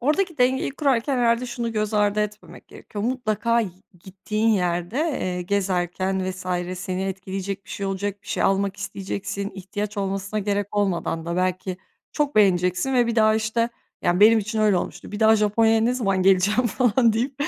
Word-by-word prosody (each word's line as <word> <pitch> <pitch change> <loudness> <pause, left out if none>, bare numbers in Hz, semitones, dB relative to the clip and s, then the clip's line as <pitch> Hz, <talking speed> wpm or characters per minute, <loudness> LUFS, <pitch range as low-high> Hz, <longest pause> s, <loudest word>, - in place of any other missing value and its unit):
oradaki 310 +5 0
dengeyi 255 +2 +2
kurarken 275 -2 0
herhâlde 235 +1 +2
şunu 235 -1 -3
göz 215 0 -1
ardı 210 0 +2
etmemek 210 0 -6
gerekiyor, 205 -1 -7
mutlaka 235 -1 0
i 220 - -2 0.4
gittiğin 210 +3 -2
yerde, 180 0 0
eee, 225 - -1
gezerken 185 0 -1
vs. 185 0 -9 0.3
seni 185 0 -3
etkileyecek 195 0 -5
bir - - -15
şey 200 - -4
olacak, 200 +1 -3
bir - - -23
şey - - -1
almak 195 0 +1
isteyeceksin, 200 0 -4
ihtiyaç 205 +2 -5
olmasına 195 +1 -2
gerek 205 0 -2
olmadan 175 -4 -1
da 170 0 -2
belki 185 0 -1 0.4
çok 295 -1 -1
beğeneceksin 185 +4 +3
ve 245 -2 +4
bir 235 - -2
daha, 215 -1 +5
işte 220 +1 0 0.3
Yani, 175 +2 +1
benim 220 +2 +7
için 215 +1 -3
öyle 210 -3 +4
olmuştu, 175 - -5
"Bir 205 - -5
daha 220 0 +6
Japonya'ya 220 +1 +3
ne 235 +3 +2
zaman 195 -7 0
geleceğim?" 195 +6 +3
falan 235 +1 +3
deyip, 245 +5 -1
205 Hz, 170 wpm, -23 LUFS, 190-230 Hz, 0.4 s, benim